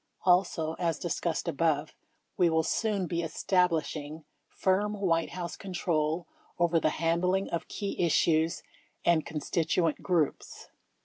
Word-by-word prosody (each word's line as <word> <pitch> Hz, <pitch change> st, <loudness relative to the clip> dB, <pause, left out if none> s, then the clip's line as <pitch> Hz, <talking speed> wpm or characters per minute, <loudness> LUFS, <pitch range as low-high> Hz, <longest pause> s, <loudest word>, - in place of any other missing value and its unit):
Also, 180 Hz, -3 st, +3 dB
as 165 Hz, -3 st, 0 dB
discussed 170 Hz, -1 st, -2 dB
above, 155 Hz, 0 st, 0 dB, 0.4 s
we 175 Hz, -2 st, +4 dB
will 160 Hz, 0 st, +2 dB
soon 205 Hz, +2 st, 0 dB
be 170 Hz, 0 st, -2 dB
establish 170 Hz, 0 st, +1 dB
ing 155 Hz, +1 st, -7 dB, 0.2 s
firm 205 Hz, +3 st, 0 dB
White 165 Hz, -4 st, +1 dB
House 175 Hz, -1 st, -5 dB
control 170 Hz, -3 st, -1 dB, 0.3 s
over 170 Hz, -1 st, +3 dB
the 155 Hz, -, +2 dB
handling 170 Hz, +5 st, +1 dB
of 170 Hz, -, -3 dB
key 200 Hz, -3 st, -3 dB
issues 165 Hz, 0 st, +2 dB, 0.4 s
and 170 Hz, -2 st, +3 dB
constituent 160 Hz, +1 st, 0 dB
groups. 170 Hz, -6 st, -1 dB
170 Hz, 125 wpm, -29 LUFS, 160-180 Hz, 0.4 s, we